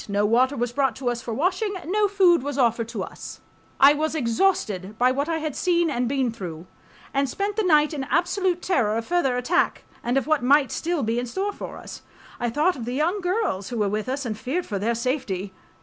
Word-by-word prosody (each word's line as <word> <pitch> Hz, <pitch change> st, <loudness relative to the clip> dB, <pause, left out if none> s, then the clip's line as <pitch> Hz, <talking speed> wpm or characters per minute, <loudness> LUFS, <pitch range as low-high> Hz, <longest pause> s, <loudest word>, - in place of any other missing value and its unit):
No 200 Hz, +1 st, +1 dB
water 255 Hz, +6 st, +3 dB
was 240 Hz, 0 st, -1 dB
brought 270 Hz, -4 st, +1 dB
to 255 Hz, 0 st, -2 dB
us 235 Hz, 0 st, -4 dB
for 235 Hz, -, -6 dB
washing, 370 Hz, -, 0 dB
no 410 Hz, +5 st, +2 dB
food 375 Hz, -5 st, +4 dB
was 285 Hz, +1 st, -4 dB
offered 230 Hz, -3 st, +2 dB
to -, -, -4 dB
us.... -, -, -9 dB, 0.4 s
I 280 Hz, +2 st, +8 dB
was 310 Hz, +2 st, -1 dB
exhausted 225 Hz, -, 0 dB
by 250 Hz, +2 st, +4 dB
what 280 Hz, +4 st, -1 dB
I 325 Hz, -, 0 dB
had 310 Hz, -3 st, -4 dB
seen 345 Hz, -3 st, +1 dB
and 245 Hz, -2 st, -1 dB
been 265 Hz, -3 st, 0 dB
through, 175 Hz, -7 st, -7 dB, 0.5 s
and 275 Hz, 0 st, +1 dB
spent 400 Hz, +7 st, -2 dB
the 440 Hz, -, +1 dB
night 305 Hz, -5 st, +3 dB
in 275 Hz, -3 st, -3 dB
absolute 360 Hz, +3 st, 0 dB
terror 230 Hz, -, +1 dB
of 230 Hz, -, -3 dB
further 275 Hz, -7 st, +1 dB
attack 280 Hz, +9 st, +1 dB, 0.2 s
and 245 Hz, +2 st, 0 dB
of 270 Hz, -, +1 dB
what 310 Hz, -1 st, +2 dB
might 275 Hz, +2 st, +4 dB
still 335 Hz, -2 st, -1 dB
be 225 Hz, +2 st, 0 dB
in 245 Hz, -, -3 dB
store 385 Hz, -, -2 dB
for -, -, -8 dB
us. -, -, -10 dB, 0.4 s
I 240 Hz, -, 0 dB
thought 305 Hz, +9 st, +1 dB
of 235 Hz, -, -6 dB
the 245 Hz, +1 st, -3 dB
young 340 Hz, +8 st, 0 dB
girls 360 Hz, -, -1 dB
who 240 Hz, -, -4 dB
were 210 Hz, -2 st, +1 dB
with 215 Hz, +4 st, -2 dB
us 270 Hz, +1 st, -2 dB
and 220 Hz, -3 st, -2 dB
feared 280 Hz, +11 st, -3 dB
for 200 Hz, -3 st, -3 dB
their 230 Hz, +4 st, 0 dB
safety. 225 Hz, -7 st, -2 dB
270 Hz, 230 wpm, -24 LUFS, 235-345 Hz, 0.5 s, I